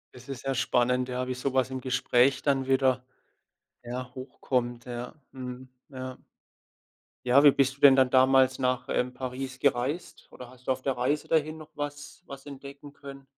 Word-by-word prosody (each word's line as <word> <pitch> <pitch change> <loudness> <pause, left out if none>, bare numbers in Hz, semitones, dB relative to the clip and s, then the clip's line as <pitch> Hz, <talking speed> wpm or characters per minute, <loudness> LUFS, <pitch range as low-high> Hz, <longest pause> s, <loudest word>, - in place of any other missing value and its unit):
Das 125 +2 -14
ist 135 -1 -6
ja 135 - 0
spannend, 125 0 +1
ja, 125 0 -3
wie 130 - -2
so 130 +1 -3
was 130 0 +2
im 130 -1 -4
Gespräch 125 +1 +2
dann 135 -2 +1
wieder, 130 -1 +2 0.8
ja, 125 +1 -6
hochkommt. 125 -2 -3
Ja, 125 +3 -6 0.2
mhm. 130 0 -8 0.2
Ja. 130 -1 -7 1.1
Ja, 130 +3 +6
wie 145 - +10
bist 135 0 +1
du - - -28
denn 140 -2 +8
dann 130 -1 +4
damals 130 0 +4
nach, 125 -1 -1
ähm, 125 0 0
Paris 130 0 -5
gereist 140 +5 -1
oder 125 -1 -11
hast 130 0 -19
du - - +2
auf 130 - -10
der 135 -2 -2
Reise 140 +5 -1
dahin 155 0 +1
noch 155 -1 -12
was 145 +3 -6
was 135 0 -10
entdecken 140 0 -10
können? 140 -1 -11
130 Hz, 180 wpm, -28 LUFS, 125-140 Hz, 1.1 s, wie